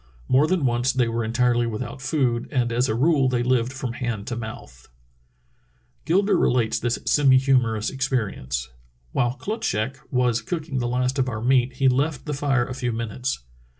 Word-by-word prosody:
More 140 +4 +4
than 180 -5 +1
once 120 +1 +2
they 125 -3 +1
were 115 0 -1
entirely 120 +1 +1
without 120 +4 -5
food, 130 -4 0
and 120 -2 0
as 120 +2 +1
a 110 - 0
rule 140 0 +3
they 125 -1 0
lived 125 -1 +1
from 130 -2 -4
hand 120 -4 -3
to 120 - -4
mouth. 110 - -8 1.2
Gilder 195 +4 +3
relates 115 -3 +2
this 120 0 -1
semi 135 -3 +5
humorous 125 -5 +2
experience: 95 - -2 0.4
"While 120 -1 0
Klutschak 135 - -2
was 125 -2 +1
cooking 150 +1 -3
the 120 - -1
last 125 +2 0
of 130 -1 +1
our 110 -3 -4
meat 130 0 +3
he 135 +1 +2
left 135 +2 +1
the 150 - -3
fire 135 -3 +1
a 130 - -6
few 125 -1 -2
minutes. 115 - -3
125 Hz, 175 wpm, -24 LUFS, 115-135 Hz, 1.2 s, semi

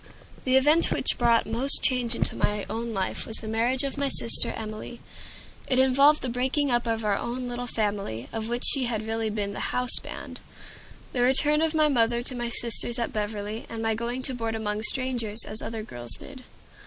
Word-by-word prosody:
The 260 0 +4
event 300 +5 +5
which - - +3
brought 235 -1 +3
most 265 +5 +5
change 245 -3 +3
into - - -1
my 205 -1 -1
own 230 +1 -4
life 190 -3 -3
was 225 - +1
the 220 - -8
marriage 235 +4 0
of 275 0 -4
my 280 -1 0
sister 230 - +2
Emilie. 215 +2 -8 0.7
It 255 - +1
involved 275 +3 +4
the - - -1
breaking 260 +3 -1
up 240 0 0
of 225 -1 -2
our 205 -1 +1
own 245 +1 -4
little 245 0 -5
family, 205 - -3
of 225 0 -4
which 240 +1 -3
she 270 -3 +5
had 220 -2 -3
really 225 0 -2
been 205 -1 -4
the - - -6
"houseband," 250 -1 +1 0.7
the 245 - -1
return 295 +4 +3
of 320 0 0
my 310 -1 +3
mother 235 -3 +1
to 255 - 0
my 240 -1 -4
sisters 235 +1 -1
at 235 - -3
Beverly, 210 +1 -4
and 225 -1 -6
my 225 0 +1
going 235 +3 -4
to 265 - 0
board 230 -2 -4
among 210 -1 -3
strangers, 235 -3 0
as 215 +1 -4
other 220 -1 -5
girls 120 - -6
did. 265 -2 -9
235 Hz, 200 wpm, -25 LUFS, 220-255 Hz, 0.7 s, event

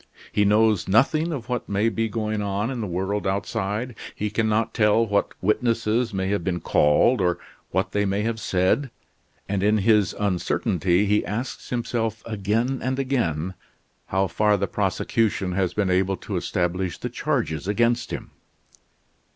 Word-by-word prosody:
He 105 - +2
knows 105 -1 +3
nothing 145 - +3
of 135 -7 -5
what 125 -2 -3
may 100 +2 +1
be 115 +1 0
going 110 -1 -2
on 100 +4 -1
in 125 -3 -4
the 105 - -2
world 95 +3 -2
outside. 105 +4 -2 0.2
He 105 0 -2
can 110 +1 +1
not 110 +1 +1
tell 105 +1 +3
what 100 -2 0
witnesses 115 +2 +1
may 95 -1 -2
have 100 -3 0
been 90 -1 -1
called, 80 +11 +3
or 90 -1 +2 0.3
what 95 +1 -1
they 105 - +1
may 100 +1 0
have 115 0 -2
said, 95 +9 +1 0.6
and 100 -1 -1
in 105 +2 +3
his 105 -1 +3
uncertainty 95 -1 +1
he 105 +1 +2
asks 110 +8 -5
himself 115 -2 -2
again 115 +5 -1
and 130 +1 -1
again 95 - -1 0.5
how 95 +1 +1
far 105 +3 +2
the 100 - 0
prosecution 105 0 0
has 95 -1 -1
been 100 -3 +1
able 95 +1 +1
to - - -6
establish 90 +1 -1
the - - -4
charges 120 - -2
against 120 +3 +1
him. - - -6
105 Hz, 160 wpm, -24 LUFS, 95-115 Hz, 0.6 s, knows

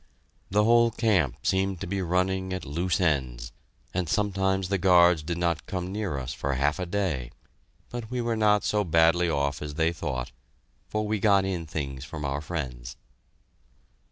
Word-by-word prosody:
The 105 +2 +3
whole 115 +1 +5
camp 100 - +1
seemed 95 -1 +1
to - - -2
be 100 +2 -2
running 95 +1 0
at 95 - -4
loose 85 +7 -1
ends, 65 -8 0 0.4
and 90 -3 -1
sometimes 95 -2 0
the 100 -1 +1
guards 90 -3 +5
did 85 +3 -3
not 85 -2 -1
come 90 -1 -3
near 100 -7 -2
us 65 -1 -4
for 70 -1 -2
half 75 +6 +1
a 90 - -3
day, 85 -10 -1 0.6
but 120 -3 -6
we 125 - -3
were 120 -1 0
not 105 -1 +3
so 105 -1 +1
badly 85 0 +3
off 70 -2 -1
as 75 -1 -6
they 80 +1 +1
thought, 65 -5 -4 0.6
for 110 0 -2
we 105 0 -1
got 100 -1 +4
in 90 -4 -3
things 70 -4 -4
from 75 0 -6
our 70 +1 -2
friends. 65 -7 -5
90 Hz, 175 wpm, -27 LUFS, 75-100 Hz, 0.6 s, whole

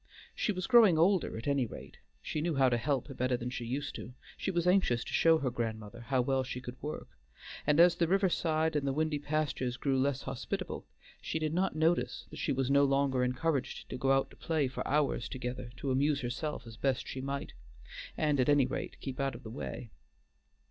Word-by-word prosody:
She - - 0
was 185 -2 -3
growing 225 -9 +6
older 180 - +3
at 115 - -6
any 140 -4 +2
rate; - - -11 0.2
she 155 - -2
knew 165 -1 0
how 135 -1 +4
to 120 - +1
help 135 +1 -1
better 125 0 +1
than 120 +1 -4
she 120 - -4
used; 140 +5 -3 0.4
she - - -3
was 175 -2 0
anxious 180 -11 +3
to - - -8
show 165 -1 +5
her 135 -5 -1
grandmother 110 -3 -4
how 130 +2 +1
well 135 +1 +1
she 130 -1 -5
could 125 0 -9
work, 150 +2 -5 0.6
and 150 +1 +4
as 175 0 +8
the 170 - +1
river 195 +2 +3
side 160 -2 +1
and 140 -2 0
the 135 - +1
windy 155 0 0
pastures 145 -4 -1
grew 135 -1 +1
less 140 0 0
hospitable, - - -4 0.3
she - - -2
did 155 -1 -1
not 185 +1 +1
notice 160 +2 +1
that - - -8
she - - 0
was 135 0 0
no 140 0 +5
longer 135 -2 +2
encouraged 130 +1 -1
to - - -3
go 135 +1 +2
out 135 0 +2
to - - -15
play 155 -4 0
for 130 - -5
hours 140 -4 +1
together 125 -1 -5
to 135 +2 -2
amuse 140 +2 +2
herself 135 +3 -3
as 115 -1 -11
best 135 -2 0
she 130 - -5
might, 140 +1 -4 0.6
and 150 -3 +1
at 130 - +3
any 145 -3 +5
rate - - -5
keep 135 -2 -5
out 135 -2 0
of 120 - -11
the 110 - -8
way. 120 -2 -6
140 Hz, 215 wpm, -32 LUFS, 125-155 Hz, 0.6 s, as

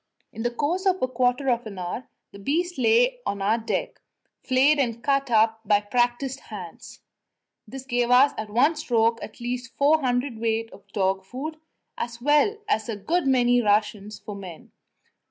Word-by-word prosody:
In 225 - -6
the 240 - +1
course 320 +10 -1
of 375 0 +2
a 255 - +1
quarter 255 +1 0
of 240 -1 -1
an 200 -3 -9
hour 180 +7 -5 0.2
the 200 - -12
beast 330 - -1
lay - - +3
on 200 - -3
our 210 +4 +1
deck, - - -3 0.4
flayed 270 +3 +3
and 235 -3 -1
cut 275 -1 +1
up 225 -1 +3
by 205 -1 +3
practised 245 +5 -1
hands; 185 -6 -10 0.7
this 265 0 -8
gave 245 -2 0
us 255 +3 +6
at 215 -1 -5
one 265 +9 +3
stroke 230 -6 +1
at 220 - -10
least 245 0 -5
four 295 +3 +4
hundredweight 230 -3 -1
of 200 - -16
dog 190 -1 0
food, 275 +10 -6 0.4
as 235 0 -4
well 295 - +3
as 235 - 0
a 225 - -2
good 320 - -1
many 245 -2 +4
rations 210 -1 0
for 210 - -8
men. 185 -5 -10
245 Hz, 175 wpm, -25 LUFS, 220-275 Hz, 0.7 s, us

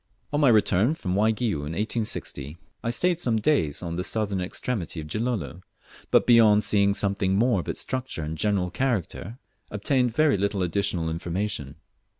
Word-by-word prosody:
On 145 - +1
my 145 -4 +5
return 110 - +3
from 90 - -3
Waigiou 110 0 +1
in 75 +2 -5
1860, 100 - -2 0.3
I 115 - -1
stayed 175 +8 0
some 115 -6 +1
days 105 - +1
on 85 -1 -4
the 90 - -2
southern 100 -2 -2
extremity 90 -2 -4
of 75 - -6
Gilolo; 110 0 -3 0.5
but, - - +4
beyond 110 -3 +6
seeing 100 -1 +3
something 100 -2 0
more 115 0 +2
of 85 - -5
its - - -2
structure 130 -10 -3
and 75 +1 -4
general 95 0 0
character, 115 -2 -2 0.3
obtained 125 +5 +1
very 155 -7 +3
little 100 -1 0
additional 90 -1 0
information. 85 -3 -3
100 Hz, 160 wpm, -25 LUFS, 90-115 Hz, 0.5 s, beyond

